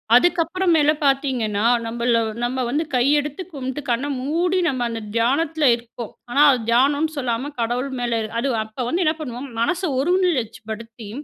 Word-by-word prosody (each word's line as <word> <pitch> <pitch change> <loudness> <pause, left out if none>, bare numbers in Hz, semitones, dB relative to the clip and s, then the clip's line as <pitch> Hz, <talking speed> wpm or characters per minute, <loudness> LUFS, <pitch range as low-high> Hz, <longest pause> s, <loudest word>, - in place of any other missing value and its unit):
அதுக்கப்புற 350 +6 +2
மேல 300 -1 +4
பார்த்திங்கன்னா, 255 -7 +1 0.2
நம்மள 235 0 +1 0.2
நம்ம 255 +1 -1
வந்து 300 +6 0
கை 245 - +3 0.2
எடுத்து 290 +4 -5
கும்ட்டு 265 0 -4
கண்ண 240 +3 0 0.2
மூடி 345 +6 0
நம்ம 255 -2 -2
அந்த 230 -1 -4
தியானத்தில 290 +6 +2
இருப்போம். 235 -1 -9 0.2
ஆனா 275 +4 +2
அது 255 - +1
தியானம்னு 285 +6 +2
சொல்லாம 255 +1 -2
கடவுள் 245 +4 -1
மேல 235 -2 0 0.2
அது 275 - -1 0.2
அப்ப 220 +3 -5
வந்து 355 +5 +1
என்ன 310 - +3
பண்ணுவோம். 255 0 -6
மனச 360 +9 0 0.2
ஒருநிலைச்சுபடுத்தி 230 - -1
260 Hz, 150 wpm, -22 LUFS, 235-300 Hz, 0.2 s, மேல